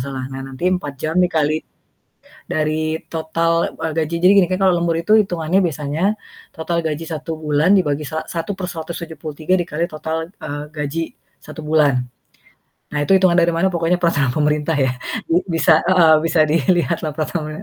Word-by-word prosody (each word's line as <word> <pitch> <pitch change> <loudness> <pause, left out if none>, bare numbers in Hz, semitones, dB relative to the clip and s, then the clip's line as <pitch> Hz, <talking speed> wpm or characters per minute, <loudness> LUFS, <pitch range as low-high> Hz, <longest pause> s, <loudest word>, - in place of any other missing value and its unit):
salah. 130 0 -4
Nah 135 - -6
nanti 135 +5 -7
4 145 -7 -3
jam 160 +6 0
dikali 155 -3 +1 0.9
dari 155 +1 -1
total, 165 +1 0
eee, 160 -1 -1
gaji. 160 +1 -1
Jadi 185 +2 +7
gini 180 - +5
kan 185 +2 -2
kalau 185 -2 +4
lembur 170 -1 0
itu 180 +7 +3
itungannya 175 -3 +1
biasanya, 155 +6 -1 0.4
total 170 +1 -2
gaji 155 +1 -2
1 160 +1 -4
bulan 155 +4 +2
dibagi 150 -5 +1
sa 160 +2 -3
satu 170 +4 -3
per 185 -1 -5
173 160 -1 -4
dikali 170 0 -2
total, 160 +2 -4
eee, 145 -7 -7
gaji 150 +1 -3 0.4
1 155 -1 -9
bulan. 145 -5 +2 0.8
Nah 150 -1 -2
itu 190 +5 +4
hitungan 185 -2 +3
dari 170 -1 +4
mana 170 +3 +1
pokoknya 175 -1 +1
peraturan 145 -7 +1
pemerintah 150 +2 0
ya. 130 -2 +1 0.3
B 175 +3 +2
bisa 165 -1 +4
heeh, 170 -3 +5
bisa 165 0 +1
dilihatlah 165 +1 +1
peraturan 155 0 -4
160 Hz, 165 wpm, -19 LUFS, 150-170 Hz, 0.9 s, Jadi